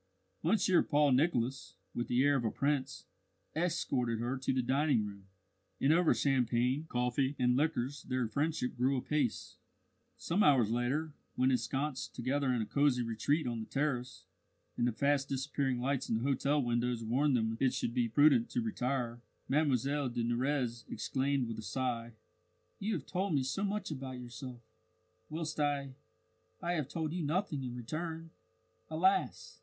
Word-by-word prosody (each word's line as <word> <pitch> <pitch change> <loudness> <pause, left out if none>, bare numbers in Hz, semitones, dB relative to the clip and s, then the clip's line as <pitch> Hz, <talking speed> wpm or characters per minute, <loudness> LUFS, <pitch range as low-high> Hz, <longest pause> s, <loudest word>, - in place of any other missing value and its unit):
Monsieur 185 +1 +3
Paul 145 -2 +3
Nicholas, 130 -2 +1 0.2
with 120 - -2
the 125 +2 +3
air 145 0 +4
of 130 - 0
a 110 - +1
prince, 140 +1 -1 0.5
escorted 140 -8 0
her 120 +3 -1
to 130 0 -1
the 130 -1 +1
dining 130 -3 +2
room; 100 -1 -9 0.5
and 140 +3 +4
over 175 0 +4
champagne, 130 +2 +1
coffee, 125 +3 0
and 125 -1 +3
liqueurs 140 -2 0
their 125 -2 -1
friendship 145 +2 -1
grew 130 +3 +2
apace. 135 -2 -1 0.6
Some 180 +5 0
hours 130 - +5
later, 135 +6 0 0.2
when 130 +1 +3
ensconced 135 +2 -2
together 130 +2 0
in 120 -3 +1
a - - -4
cosy 140 -1 +2
retreat 120 +7 0
on 120 -2 -2
the 110 - -6
terrace, 135 -3 -2 0.5
and 120 - +1
the - - +2
fast 140 +3 +1
disappearing 135 -1 -1
lights 135 +1 -1
in 115 - +2
the 115 - -1
hotel 140 +2 +2
windows 120 0 0
warned 130 +5 +2
them 110 -1 0
it - - +3
would 130 - +2
soon - - -1
be 120 -1 0
prudent 155 - +5
to 250 - -1
retire, 125 - -2 0.3
Mlle 140 -1 +1
de 120 0 -2
Nurrez 120 0 0
exclaimed 135 +3 0
with 115 -1 -5
a - - -4
sigh: 120 0 -2 0.7
"You 215 +3 -1
have - - -5
told 185 -3 -1
me 135 - +2
so 145 +10 -2
much 205 -2 -2
about 130 -3 -5
yourself, 120 0 -8 0.7
whilst 155 -1 -4
I 140 -2 0 0.7
I 175 - -2
have 150 -6 -2
told 160 0 -3
you 180 - -2
nothing 155 -2 -1
in 125 -1 -5
return. 160 +7 -5 0.6
Alas! 180 +5 +1
135 Hz, 165 wpm, -33 LUFS, 120-150 Hz, 0.7 s, hours